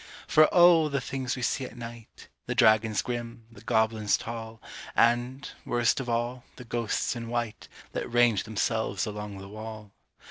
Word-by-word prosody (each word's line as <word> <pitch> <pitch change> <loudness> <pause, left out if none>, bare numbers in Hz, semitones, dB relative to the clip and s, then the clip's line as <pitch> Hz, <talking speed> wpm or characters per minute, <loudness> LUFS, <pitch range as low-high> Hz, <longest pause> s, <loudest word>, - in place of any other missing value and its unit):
For 155 0 +5
O! 170 -3 +6
the 140 -1 0
things 130 0 -3
we 125 - -5
see 130 - 0
at 125 - -8
night 115 -1 -10 0.2
The - - -2
dragons 110 0 +4
grim, 120 -1 -5
the 115 - -14
goblins 110 -2 +1
tall, 115 -1 -7 0.4
And, 120 +3 +2 0.2
worst 120 +1 +1
of 130 -2 -4
all, 120 +1 -1
the 125 - -11
ghosts 115 0 -1
in 115 -1 -6
white 120 -2 -3 0.2
That - - -4
range 120 -3 +3
themselves 110 -1 -1
along 105 -2 -6
the 95 0 -9
wall! 110 0 -9
115 Hz, 165 wpm, -28 LUFS, 110-120 Hz, 0.4 s, O